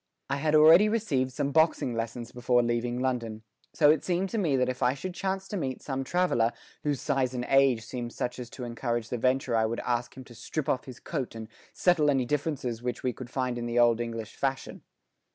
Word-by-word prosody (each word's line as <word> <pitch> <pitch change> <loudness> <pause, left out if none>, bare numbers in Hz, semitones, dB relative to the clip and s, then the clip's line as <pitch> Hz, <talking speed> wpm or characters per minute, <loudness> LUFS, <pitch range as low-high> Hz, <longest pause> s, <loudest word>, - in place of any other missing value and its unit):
I 140 - +1
had 155 +2 +1
already 165 +7 +7
received 155 - 0
some 140 +3 -2
boxing 160 -5 +2
lessons 115 +1 -4
before 125 0 +2
leaving 120 +1 -1
London, 115 -4 -2 0.3
so 150 -2 +5
it 155 - +1
seemed 185 +2 0
to 225 - -2
me 160 -8 +1
that 125 -1 +2
if 130 0 -4
I 125 - +3
should 180 +6 -5
chance 190 +1 -3
to 205 - -3
meet 130 -7 -4
some 135 -1 -3
traveller 130 -8 +1 0.3
whose 145 -3 -1
size 130 -3 0
and 120 0 -2
age 135 -4 +3
seemed 120 0 -5
such 125 +1 -4
as 125 -1 -7
to 125 - -8
encourage 120 -1 -3
the 125 - -3
venture 130 0 +1
I 110 0 +3
would 115 +1 -3
ask 120 0 -2
him 130 - -8
to 120 - -14
strip 145 +5 -4
off 130 - 0
his 130 - -10
coat 135 -8 -4
and 110 -1 -7 0.2
settle 170 -5 +3
any 135 -3 +2
differences 135 -4 -2
which 125 -1 -4
we 125 -1 0
could 125 0 -9
find 125 -2 -2
in 120 - -3
the 120 0 -2
old 120 -1 +4
English 115 -1 -5
fashion. 135 -1 -3
130 Hz, 225 wpm, -28 LUFS, 120-150 Hz, 0.3 s, already